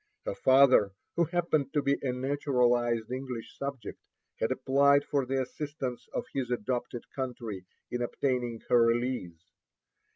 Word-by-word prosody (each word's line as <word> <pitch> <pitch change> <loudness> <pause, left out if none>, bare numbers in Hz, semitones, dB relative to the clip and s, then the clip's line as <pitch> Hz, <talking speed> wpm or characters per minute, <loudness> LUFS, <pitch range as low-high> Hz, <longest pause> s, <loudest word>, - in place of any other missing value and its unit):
Her - - -2
father, 130 -7 +5 0.2
who 170 - +3
happened 160 -5 0
to 145 - +2
be 140 0 +1
a 135 - 0
naturalized 125 -3 +1
English 130 -3 -5
subject, 140 -6 -6 0.4
had 110 - 0
applied 140 +2 +4
for 140 -3 0
the 135 +1 0
assistance 140 -2 -5
of - - -3
his 130 -3 -2
adopted 120 0 -2
country 120 -8 -5 0.3
in 120 - -2
obtaining 120 -2 -1
her 120 - +5
release. 115 -8 -1
130 Hz, 135 wpm, -29 LUFS, 120-140 Hz, 0.4 s, father